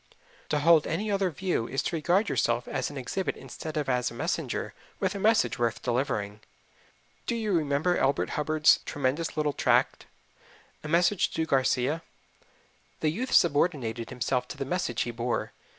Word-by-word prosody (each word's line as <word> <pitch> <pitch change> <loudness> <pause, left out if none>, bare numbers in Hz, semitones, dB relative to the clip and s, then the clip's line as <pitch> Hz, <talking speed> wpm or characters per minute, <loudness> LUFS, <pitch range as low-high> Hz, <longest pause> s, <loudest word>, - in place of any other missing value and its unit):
To 150 - +1
hold 160 +1 +5
any 205 +6 -2
other 195 -2 +1
view 175 -8 -2
is 135 - -2
to - - -2
regard 175 +7 +2
yourself 120 -7 0
as 135 -2 -2
an 145 - -8
exhibit 180 +9 -3
instead 155 -1 -7
of 150 - -1
as 125 -2 +1
a - - -11
messenger - - -2 0.3
with - - 0
a 200 - -5
message 210 - +2
worth 115 0 -1
delivering. 120 -5 -1 0.9
Do 235 - 0
you 220 -2 -1
remember 155 +1 +1
Elbert 135 +1 +1
Hubbard's 155 +1 +3
tremendous 145 +3 -1
little 150 -1 +1
tract, - - +1 0.8
"A - - -5
Message 175 +4 +3
to 160 - 0
Garcia"? 135 +2 +1 1.0
The 155 - +2
youth 245 +10 -4
subordinated 140 -8 +2
himself 125 0 -1
to 145 - -8
the 135 - -3
message 135 -6 -1
he 120 - -4
bore. 120 +1 -2
145 Hz, 165 wpm, -28 LUFS, 125-170 Hz, 1.0 s, hold